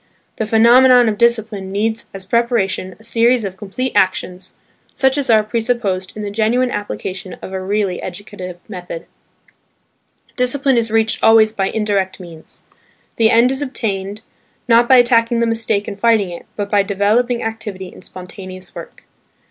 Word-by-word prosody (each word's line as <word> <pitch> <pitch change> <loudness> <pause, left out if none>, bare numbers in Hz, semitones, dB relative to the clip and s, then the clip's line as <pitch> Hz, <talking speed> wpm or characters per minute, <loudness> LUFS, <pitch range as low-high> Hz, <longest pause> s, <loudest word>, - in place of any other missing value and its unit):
The 220 - -2
phenomenon 245 +2 +6
of 210 -2 -1
discipline 220 -5 0
needs 220 +3 -2
as 195 -1 -9
preparation 200 -4 0
a - - -18
series 230 0 +2
of 190 -1 -5
complete 225 +6 -4
actions, 185 -1 0 0.4
such 265 0 +2
as 280 -3 -1
are 220 -2 +5
presupposed 215 -4 -2
in 210 - -5
the 205 - -4
genuine 235 +4 +1
application 190 -3 -5
of 190 - -7
a 190 - -3
really 195 -1 -1
educative 185 -1 -8
method. 175 -4 -8 1.3
Discipline 265 +1 +1
is 230 -1 +1
reached 220 0 +1
always 225 -1 +6
by 195 -3 -1
indirect 200 -4 -1
means. 165 -3 -13 0.5
The 225 -1 +4
end 235 +3 +4
is 270 +1 -1
obtained, 210 -6 -3 0.4
not 235 0 +4
by 260 - +7
attacking 235 -1 +3
the 235 - +2
mistake 225 -2 -1
and 200 -1 -7
fighting 220 -4 +2
it, 170 - -10
but 205 -1 -4
by 205 -1 +4
developing 215 +5 0
activity 210 -4 -5
in - - -14
spontaneous 185 0 -10
work. - - -11
215 Hz, 155 wpm, -17 LUFS, 195-235 Hz, 1.3 s, by